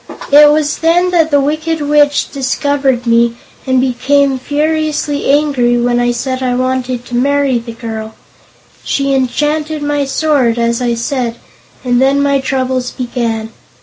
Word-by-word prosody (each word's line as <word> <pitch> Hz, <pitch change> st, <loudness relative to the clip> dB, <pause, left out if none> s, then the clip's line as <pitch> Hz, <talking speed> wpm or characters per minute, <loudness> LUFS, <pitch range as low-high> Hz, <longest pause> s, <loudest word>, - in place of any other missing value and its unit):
It 295 Hz, +1 st, +8 dB
was 300 Hz, -1 st, 0 dB
then 350 Hz, +2 st, +2 dB
that 330 Hz, -3 st, +2 dB
the 285 Hz, -2 st, +3 dB
Wicked 310 Hz, +3 st, -1 dB
Witch 290 Hz, 0 st, +2 dB
discovered 270 Hz, -2 st, -1 dB
me 235 Hz, 0 st, +2 dB, 0.3 s
and 260 Hz, 0 st, +2 dB
became 265 Hz, +1 st, +1 dB
furiously 300 Hz, +1 st, -1 dB
angry 275 Hz, -4 st, +2 dB
when 240 Hz, 0 st, +1 dB
I 245 Hz, 0 st, +1 dB
said 255 Hz, +2 st, -3 dB
I 250 Hz, -1 st, 0 dB
wanted 255 Hz, -1 st, -2 dB
to 245 Hz, -, -6 dB
marry 275 Hz, 0 st, +1 dB
the 230 Hz, 0 st, -9 dB
girl. 220 Hz, -1 st, -7 dB, 0.7 s
She 275 Hz, 0 st, -1 dB
enchanted 295 Hz, +4 st, -1 dB
my 290 Hz, -1 st, 0 dB
sword, 270 Hz, -4 st, +1 dB
as 235 Hz, +1 st, 0 dB
I 240 Hz, -1 st, 0 dB
said, 235 Hz, 0 st, -2 dB, 0.5 s
and 245 Hz, -1 st, +1 dB
then 270 Hz, +1 st, +3 dB
my 280 Hz, -1 st, +2 dB
troubles 260 Hz, -1 st, -2 dB
began. 230 Hz, -3 st, -3 dB
265 Hz, 150 wpm, -13 LUFS, 245-290 Hz, 0.7 s, It